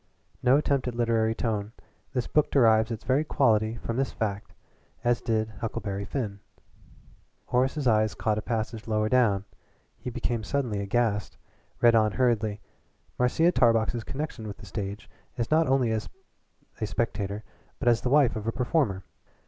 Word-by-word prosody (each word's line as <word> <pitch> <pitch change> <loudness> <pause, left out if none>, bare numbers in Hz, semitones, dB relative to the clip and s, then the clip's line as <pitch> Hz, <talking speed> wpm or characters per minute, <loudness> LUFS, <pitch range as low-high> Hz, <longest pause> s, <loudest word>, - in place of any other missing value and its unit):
"No 130 +2 +5
attempt 140 -3 0
at 125 - -3
literary 115 -1 +1
tone; 110 -2 -2 0.4
the 125 -2 -1
book 150 - +3
derives 110 -4 +4
its 115 -1 -5
very 135 +3 +2
quality 110 -7 +2
from 115 0 -4
this 135 -1 0
fact, 105 -2 -3 0.5
as 120 -1 +2
did 110 -2 0
'Huckleberry 100 -3 -3
Finn.'" 105 -4 -4 1.1
Horace's 130 +4 0
eyes 110 -2 +3
caught 110 -1 0
a - - -4
passage 115 0 -3
lower 110 -1 +1
down; 105 -6 +3 0.5
he - - -5
became 120 -1 -2
suddenly 120 -4 -1
aghast 105 0 0 0.4
read 120 -1 +6
on 110 -2 +3
hurriedly: 110 -4 +1 0.6
"Marcia 160 +8 +3
Tarbox's 115 -4 +2
connection 135 -5 -5
with 100 - -7
the - - -12
stage 100 0 -5 0.3
is 120 +2 -2
not 160 0 +4
only 130 -3 +2
as 110 -1 -2 0.7
a 110 - -1
spectator 105 -2 -2 0.3
but - - -4
as 120 -1 +4
the 125 - -1
wife 140 -3 +4
of 110 0 -5
a - - +2
performer. 120 - 0
115 Hz, 155 wpm, -27 LUFS, 110-125 Hz, 1.1 s, read